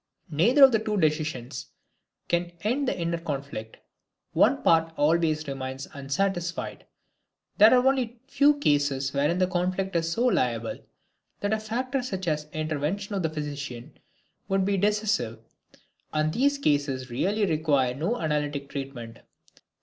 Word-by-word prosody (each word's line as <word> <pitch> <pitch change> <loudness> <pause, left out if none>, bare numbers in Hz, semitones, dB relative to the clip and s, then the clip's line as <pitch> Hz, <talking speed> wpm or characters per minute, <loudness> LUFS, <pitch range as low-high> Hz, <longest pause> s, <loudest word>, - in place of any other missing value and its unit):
Neither 230 - +5
of 265 - +9
the 225 - +3
two 215 -1 -2
decisions 150 -7 -1 0.6
can 175 0 -1
end 255 +6 0
the - - -1
inner 170 0 -1
conflict, 140 -8 -5 0.6
one - - +3
part 165 0 +4
always 155 0 +2
remains 135 -1 -5
unsatisfied. 170 +5 -2 0.7
There 215 +2 +9
are 250 0 +5
only 255 -3 +1
a - - -42
few 290 +1 +4
cases 145 - +1
wherein 145 +5 +1
the 185 - +3
conflict 185 +1 -1
is 165 0 +1
so 230 +8 0
labile, 120 - 0 0.6
that 205 +1 0
a 220 - +1
factor 255 +5 -2
such 190 -7 -4
as 150 -1 -1
the 155 - -10
intervention 155 +7 -2
of 195 - -1
the 160 - 0
physician 145 -5 -6 0.6
could 195 -1 +2
be 200 0 +1
decisive, 205 - 0 0.7
and 155 0 0
these 280 +3 +2
cases 145 - 0
really 200 - +1
require 150 -7 +1
no 170 - -2
analytic 145 -3 -2
treatment. 135 -5 -7
165 Hz, 145 wpm, -26 LUFS, 140-205 Hz, 0.7 s, of